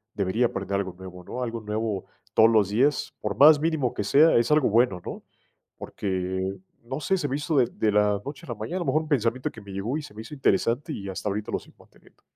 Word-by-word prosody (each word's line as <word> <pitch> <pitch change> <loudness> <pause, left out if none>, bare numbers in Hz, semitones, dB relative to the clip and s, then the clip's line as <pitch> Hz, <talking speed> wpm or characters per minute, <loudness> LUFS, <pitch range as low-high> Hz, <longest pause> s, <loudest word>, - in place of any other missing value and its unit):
debería 105 +5 +1
aprender 100 -2 -3
algo 95 -2 -3
nuevo, 90 -1 -10
¿no?, 125 +7 -5
algo 115 -2 -4
nuevo 105 -2 -3 0.3
todos 110 +1 +6
los 105 -4 +3
días, 130 +7 +1
por 105 -1 -3
más 150 +1 +8
mínimo 155 -7 0
que - - -3
sea, 145 +10 +5
es 115 - +2
algo 150 -3 +4
bueno, 110 -4 +3
¿no?, - - -6 0.6
porque, 95 0 -3 0.3
no 130 +5 -5
sé, 190 - +1
se 175 - -2
me 135 - -2
hizo 150 +1 -1
de 130 - +5
de 110 - 0
la 105 -1 +2
noche 140 -1 -7
a - - -15
la 120 - -3
mañana, 110 - -4
a - - -2
lo 170 - -3
mejor 145 +4 +2
un 155 - -11
pensamiento 125 -2 0
que 110 - -12
me 100 -1 -11
llegó 105 +9 -2
y - - -4
se 145 - -11
me 110 - -8
hizo 150 - -11
interesante, 135 +1 +1
y 100 -5 -6
hasta 95 +2 -5
ahorita 105 +1 -4
lo - - -1
sigo - - -19
manteniendo. - - -23
115 Hz, 250 wpm, -26 LUFS, 100-140 Hz, 0.6 s, más